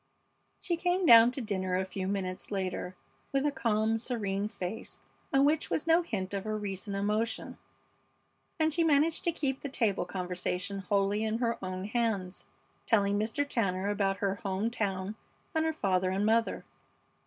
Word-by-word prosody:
She 345 -3 -1
came 360 +1 +1
down 230 -4 +9
to 265 - -4
dinner 190 -4 -1
a 190 - 0
few 190 0 -4
minutes 190 -2 -3
later 185 -2 -3 0.4
with 275 +1 +1
a 295 - +3
calm, 225 -4 +1
serene 210 -4 -2
face, 210 0 -5 0.3
on 275 +1 +5
which 305 +2 +2
was - - -1
no 330 +1 +5
hint 205 - -4
of 195 -1 -2
her 215 0 -2
recent 200 -1 -4
emotion, 215 +3 -1 1.0
and 315 -1 +2
she 335 +1 +2
managed 310 +1 +3
to 340 - +3
keep 275 -5 -2
the 285 - -4
table 220 -9 0
conversation 180 +1 -3
wholly 200 +2 +1
in 220 0 0
her 235 -3 -1
own 185 0 -4
hands, 210 -5 -1 0.4
telling 205 -2 +3
Mr. 230 +7 0
Tanner 195 -6 0
about 195 -1 +1
her 195 -1 0
home 205 0 -1
town 200 -2 -2 0.4
and 320 0 +1
her 320 - +2
father 190 -9 +1
and 195 +2 0
mother. 225 +1 +1
210 Hz, 165 wpm, -30 LUFS, 195-250 Hz, 1.0 s, down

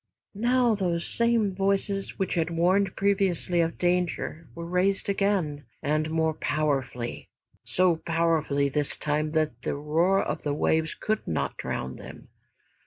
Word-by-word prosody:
Now 240 +2 +2
those 175 -5 -1
same 235 -4 +2
voices 195 +1 -1
which 190 - -1
had 165 -1 0
warned 185 +3 +2
previously 195 -3 +1
of 165 0 -1
danger 175 -2 -1
were 170 0 -6
raised 185 +3 +1
again, 195 -8 0 0.2
and 155 +1 0
more 160 0 +1
powerfully, 135 -5 -2 0.3
so 180 -2 +2
powerfully 160 -4 +1
this 145 +1 0
time 150 +1 -1
that 155 -7 0
the - - -2
roar 165 +7 +2
of - - -3
the 145 -1 -1
waves 160 +1 +1
could 215 0 -2
not 80 - -1
drown 65 0 -4
them. - - -11
170 Hz, 140 wpm, -27 LUFS, 155-195 Hz, 0.3 s, Now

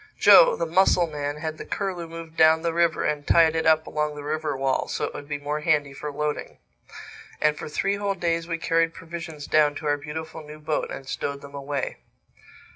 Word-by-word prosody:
Joe, - - +7
the - - -2
mussel 175 +1 +3
man, 145 -2 -4
had 155 0 -5
the - - -5
Curlew 185 -4 -3
moved 165 -1 -9
down 160 0 +5
the 170 -1 0
river 170 -1 +2
and 145 -1 -2
tied 165 -1 +5
it 160 0 0
up 160 0 +4
along 150 -1 -2
the 145 - -7
river 155 -1 -2
wall, 135 -1 0
so - - -3
it - - -6
would 145 - -8
be 145 -1 -3
more 145 +1 -3
handy 150 -3 +1
for 150 +2 -6
loading. 150 +1 -3 0.8
And 150 0 +2
for - - -7
three 195 +6 0
whole 200 -1 -1
days 170 -2 -1
we 165 -1 -2
carried 165 0 +1
provisions 165 -3 -8
down 150 -1 +3
to 155 - -7
our 145 0 +2
beautiful 160 +2 -7
new 150 0 -11
boat 155 0 -2
and 135 - -8
stowed 140 +1 -4
them 140 0 -12
away. 140 -1 -4
155 Hz, 210 wpm, -25 LUFS, 145-165 Hz, 0.8 s, Joe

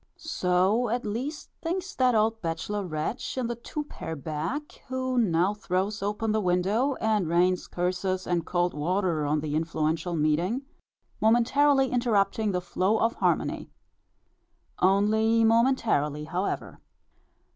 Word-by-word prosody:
So 200 - +1
at 240 +1 -1
least 255 +9 -4
thinks 370 +4 -3
that 255 -2 +2
old 220 +1 +2
bachelor 170 +5 -3
wretch 165 +10 -4
in 255 - 0
the 240 +1 -2
two 300 +6 -5
pair 165 - -7
back, 160 - -5
who 260 0 -2
now 185 -2 +2
throws 200 0 -2
open 210 +2 -1
the 215 0 +1
window, 200 +9 +1
and 215 -6 0
rains 180 +2 +2
curses 185 +1 -2
and 175 -2 0
cold 175 0 0
water 165 0 0
on 150 +1 +1
the 150 -1 -3
influential 160 +1 -1
meeting, 165 - +1 0.6
momentarily 265 +5 +3
interrupting 220 -3 +1
the 180 -1 -1
flow 185 +4 0
of 230 +1 +1
harmony. - - -1 1.1
Only 220 +4 +3
momentarily 225 - +2
however. 180 +5 -3
205 Hz, 130 wpm, -27 LUFS, 175-235 Hz, 1.1 s, momentarily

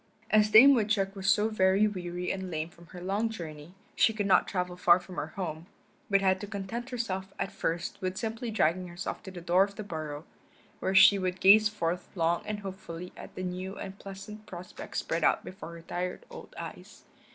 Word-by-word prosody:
As 215 0 +5
Dame 255 +6 +9
Woodchuck 210 -4 +1
was 195 0 -1
so 210 +2 +4
very 195 -1 +3
weary 180 -3 -3
and 190 -1 -4
lame 160 -1 -3
from 170 0 -18
her 180 - -10
long 205 +4 0
journey 165 -4 -8 0.2
she 225 - +4
could 210 -2 -2
not 195 - +4
travel 180 -2 -2
far 180 0 +5
from 180 0 -11
her 145 +1 -2
home, 165 -3 -4 0.4
but 195 -1 +4
had 190 -1 +2
to 205 - -5
content 215 +5 -5
herself 195 -6 -3
at 195 - -2
first 165 +1 -3
with 185 0 -2
simply 230 +2 -3
dragging 185 -4 +1
herself 175 +1 -5
to - - -9
the 180 -2 -8
door 180 +2 +4
of 200 0 -5
the 215 - -5
burrow, 155 -5 -6 0.5
where 190 - -1
she 200 +1 +8
would 185 0 -2
gaze 210 +3 +7
forth 180 -4 -3
long 170 -1 +1
and 210 -1 -3
hopefully 180 -3 -7
at - - -11
the 185 - -4
new 185 +2 -4
and 195 0 -7
pleasant 200 +2 -9
prospect 180 0 -8
spread 165 -1 -1
out - - +3
before 185 -2 -8
her 165 - -11
tired 180 +2 -4
old - - -11
eyes. - - -9
190 Hz, 205 wpm, -29 LUFS, 175-205 Hz, 0.5 s, Dame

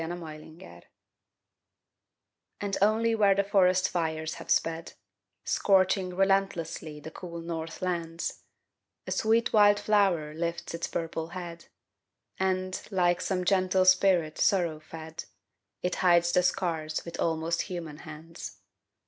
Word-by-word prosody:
FIRE 175 +2 -4
FLOWERS 155 - -11 1.8
And 200 -1 -2
only 220 +3 +3
where 205 -3 +4
the 200 - +2
forest 185 -2 +3
fires 160 -2 -2
have - - -12
sped, 165 0 0 0.5
Scorching 190 -2 +2
relentlessly 195 -5 0
the 160 +2 -9
cool 170 -1 -8
north 165 0 -6
lands, 170 -2 -3 0.6
A - - -6
sweet 225 +2 +2
wild 205 -1 +6
flower 190 -8 +2
lifts 170 +1 -4
its 170 - -3
purple 165 -1 -3
head, 170 -1 -8 0.7
And, 185 0 -1
like 175 -3 +2
some 185 -2 -1
gentle 185 -1 +3
spirit 185 -4 +3
sorrow 170 -5 +2
fed, 160 0 -9 0.6
It 180 0 0
hides 175 -1 +4
the 180 - +4
scars 165 -4 -1
with 170 - -7
almost 165 +1 0
human 165 -5 -6
hands. 160 +2 -9
175 Hz, 125 wpm, -28 LUFS, 165-190 Hz, 1.8 s, wild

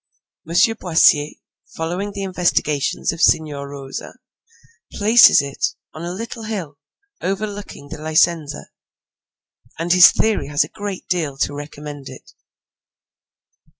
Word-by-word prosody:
M. 170 - -4 0.2
Boissier, 155 -3 +3 0.4
following 180 +5 -3
the 200 -1 -5
investigations 175 -6 0
of 165 - -7
Signor 145 -3 +1
Rosa, 135 -1 -8 0.8
places 220 - +6
it 460 - -3 0.2
on 155 - -9
a 175 - -4
little 225 +4 -6
hill 190 -10 -6 0.4
over 195 +3 -1
looking 200 -8 -9
the - - -7
Licenza, 155 -1 0 1.1
and 170 +2 +1
his 180 -1 +9
theory 220 -8 0
has 145 +2 +2
a - - -9
great 205 -3 -7
deal 160 -7 -2
to 145 - -1
recommend 145 -1 -8
it. - - -14
165 Hz, 120 wpm, -20 LUFS, 145-195 Hz, 1.1 s, his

